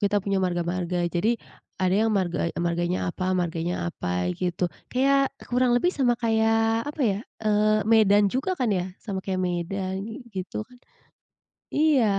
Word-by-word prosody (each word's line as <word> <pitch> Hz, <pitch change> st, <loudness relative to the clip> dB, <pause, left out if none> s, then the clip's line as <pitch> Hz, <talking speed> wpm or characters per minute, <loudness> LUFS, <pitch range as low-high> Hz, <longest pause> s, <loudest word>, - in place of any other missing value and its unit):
kita 205 Hz, 0 st, +2 dB
punya 195 Hz, -1 st, +1 dB
marga-marga. 175 Hz, 0 st, -1 dB
Jadi, 215 Hz, +7 st, +1 dB, 0.4 s
ada 185 Hz, 0 st, +2 dB
yang 220 Hz, +2 st, +3 dB
marga 180 Hz, -4 st, 0 dB
marganya 175 Hz, +1 st, 0 dB
apa 185 Hz, 0 st, -1 dB
marganya 170 Hz, 0 st, -1 dB, 0.2 s
apa, 90 Hz, 0 st, -2 dB
gitu. 180 Hz, -, -2 dB, 0.3 s
Kayak, 275 Hz, +1 st, +3 dB, 0.2 s
kurang 250 Hz, 0 st, +2 dB
lebih 355 Hz, +8 st, +2 dB
sama 245 Hz, -3 st, +2 dB
kayak 225 Hz, +1 st, +2 dB
apa 300 Hz, +1 st, -6 dB
ya, 200 Hz, -3 st, +1 dB, 0.3 s
eee, 215 Hz, 0 st, +3 dB
Medan 205 Hz, -2 st, +4 dB
juga 360 Hz, +9 st, -1 dB
kan 245 Hz, -5 st, +1 dB
ya, 185 Hz, 0 st, -2 dB
sama 195 Hz, -3 st, -5 dB
kayak 185 Hz, 0 st, -2 dB
Medan, 190 Hz, +6 st, -3 dB
gitu 190 Hz, +2 st, -4 dB
kan. 250 Hz, +2 st, -19 dB, 0.9 s
Iya, 295 Hz, -5 st, +4 dB
200 Hz, 150 wpm, -25 LUFS, 180-230 Hz, 0.9 s, Medan